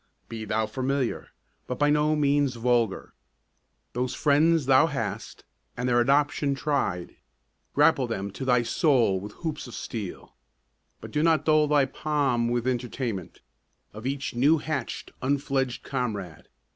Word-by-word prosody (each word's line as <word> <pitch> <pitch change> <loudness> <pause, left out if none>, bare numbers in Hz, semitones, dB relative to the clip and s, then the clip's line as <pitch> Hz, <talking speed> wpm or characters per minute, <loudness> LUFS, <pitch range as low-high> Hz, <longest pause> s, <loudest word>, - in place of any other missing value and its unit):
Be 110 -1 -6
thou 110 +1 0
familiar, 130 +3 -2 0.4
but 125 - -3
by 145 0 +3
no 150 +1 +2
means 145 -3 +2
vulgar. 115 -3 0 0.8
Those 125 +1 -2
friends 155 +1 +3
thou 130 +4 +5
hast, 115 -8 -5 0.3
and 125 +1 -1
their 120 -1 +3
adoption 140 +2 +2
tried, 135 - -2 0.6
Grapple 145 -3 +4
them 100 -3 -4
to 115 - -7
thy 125 -2 +3
soul 120 - +2
with 105 +2 -8
hoops 155 -5 -5
of 120 - -9
steel; 105 -6 -6 0.7
But - - -9
do 150 - 0
not 160 -1 +3
dull 155 -1 +4
thy 145 -2 +4
palm 135 -4 0
with 120 0 -1
entertainment 120 -6 -3 0.5
Of 110 +4 -6
each 140 0 -3
new 140 +7 +4
hatch'd, 150 -5 -4
unfledged 135 -2 -1
comrade. 105 - -4
130 Hz, 140 wpm, -26 LUFS, 115-145 Hz, 0.8 s, thou